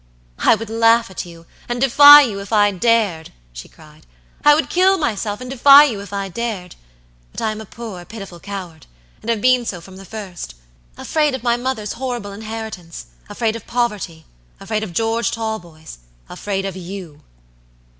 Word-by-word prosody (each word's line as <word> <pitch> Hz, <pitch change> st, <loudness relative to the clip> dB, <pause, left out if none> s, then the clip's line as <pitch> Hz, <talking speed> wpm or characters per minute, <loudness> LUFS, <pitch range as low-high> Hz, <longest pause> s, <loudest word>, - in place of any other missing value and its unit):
"I -, -, +4 dB
would 220 Hz, 0 st, -8 dB
laugh 230 Hz, -1 st, +3 dB
at 185 Hz, -, -6 dB
you 165 Hz, -1 st, -14 dB, 0.2 s
and 240 Hz, 0 st, -2 dB
defy 285 Hz, +3 st, +9 dB
you, 210 Hz, -7 st, -3 dB
if 200 Hz, +2 st, -9 dB
I 205 Hz, -2 st, +4 dB
dared," 200 Hz, -5 st, 0 dB, 0.2 s
she -, -, -10 dB
cried; 155 Hz, -1 st, -19 dB, 0.4 s
"I 295 Hz, 0 st, +7 dB
would 315 Hz, -, 0 dB
kill 380 Hz, +2 st, +3 dB
myself 215 Hz, -, -2 dB
and 250 Hz, -, -7 dB
defy 275 Hz, +3 st, +7 dB
you, 230 Hz, -9 st, -1 dB
if 200 Hz, -, -11 dB
I 200 Hz, -1 st, -3 dB
dared. 195 Hz, -3 st, -5 dB, 0.6 s
But -, -, -8 dB
I 220 Hz, -, 0 dB
am 215 Hz, 0 st, -7 dB
a 220 Hz, -, -11 dB
poor, 215 Hz, -7 st, -9 dB
pitiful 195 Hz, -3 st, -10 dB
coward, 180 Hz, -5 st, -8 dB, 0.3 s
and 225 Hz, -, -7 dB
have 225 Hz, -3 st, 0 dB
been 255 Hz, 0 st, +3 dB
so 190 Hz, -6 st, -5 dB
from 190 Hz, +2 st, -14 dB
the 195 Hz, -, -11 dB
first. 185 Hz, -, -8 dB, 0.4 s
Afraid 300 Hz, -3 st, 0 dB
of 260 Hz, -, -8 dB
my 235 Hz, -1 st, +2 dB
mother's 240 Hz, -4 st, -3 dB
horrible 240 Hz, -5 st, -5 dB
inheritance; 215 Hz, -, -8 dB, 0.2 s
afraid 225 Hz, -1 st, -1 dB
of 230 Hz, -, -9 dB
poverty; 210 Hz, -9 st, -3 dB, 0.3 s
afraid 215 Hz, -1 st, -3 dB
of 205 Hz, -, -6 dB
George 225 Hz, +3 st, 0 dB
Talboys; 175 Hz, -, -6 dB, 0.3 s
afraid 195 Hz, -, -4 dB
of 195 Hz, -2 st, -5 dB
you." 180 Hz, -4 st, -9 dB
215 Hz, 175 wpm, -19 LUFS, 190-235 Hz, 0.6 s, defy